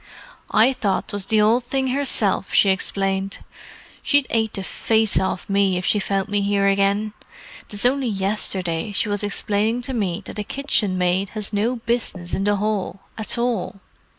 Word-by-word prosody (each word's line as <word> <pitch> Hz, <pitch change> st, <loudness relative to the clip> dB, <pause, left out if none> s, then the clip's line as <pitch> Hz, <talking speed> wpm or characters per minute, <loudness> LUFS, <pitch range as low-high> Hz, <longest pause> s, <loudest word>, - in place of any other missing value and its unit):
"I 235 Hz, +5 st, +4 dB
thought 210 Hz, -7 st, -1 dB
'twas 205 Hz, -2 st, -2 dB
the 215 Hz, -1 st, +4 dB
Ould 230 Hz, +4 st, +3 dB
Thing 265 Hz, +1 st, -1 dB
hersilf," 250 Hz, -8 st, 0 dB
she 200 Hz, -, +6 dB
explained. 195 Hz, 0 st, -1 dB, 0.6 s
"She'd 285 Hz, -2 st, +3 dB
ate 220 Hz, -2 st, +1 dB
the 195 Hz, -, -3 dB
face 220 Hz, +2 st, +1 dB
off 190 Hz, -1 st, -2 dB
me 195 Hz, -2 st, +2 dB
if 180 Hz, -, -3 dB
she 210 Hz, -, +2 dB
found 195 Hz, 0 st, -1 dB
me 205 Hz, -1 st, +1 dB
here 200 Hz, 0 st, +2 dB
again—'tis 205 Hz, -, -2 dB
only 265 Hz, +1 st, +2 dB
yesterday 195 Hz, -2 st, 0 dB
she 210 Hz, -, 0 dB
was 205 Hz, -1 st, -1 dB
explaining 215 Hz, +3 st, 0 dB
to 265 Hz, -, -5 dB
me 200 Hz, -4 st, -2 dB
that -, -, -6 dB
a -, -, -1 dB
kitchenmaid 190 Hz, -8 st, 0 dB
has 210 Hz, 0 st, -3 dB
no 220 Hz, +5 st, +1 dB
business 230 Hz, -7 st, -3 dB
in 195 Hz, -, 0 dB
the 205 Hz, 0 st, +3 dB
hall, 200 Hz, -2 st, -2 dB
at 220 Hz, +2 st, 0 dB
all. 235 Hz, -6 st, -1 dB
205 Hz, 165 wpm, -22 LUFS, 195-230 Hz, 0.6 s, she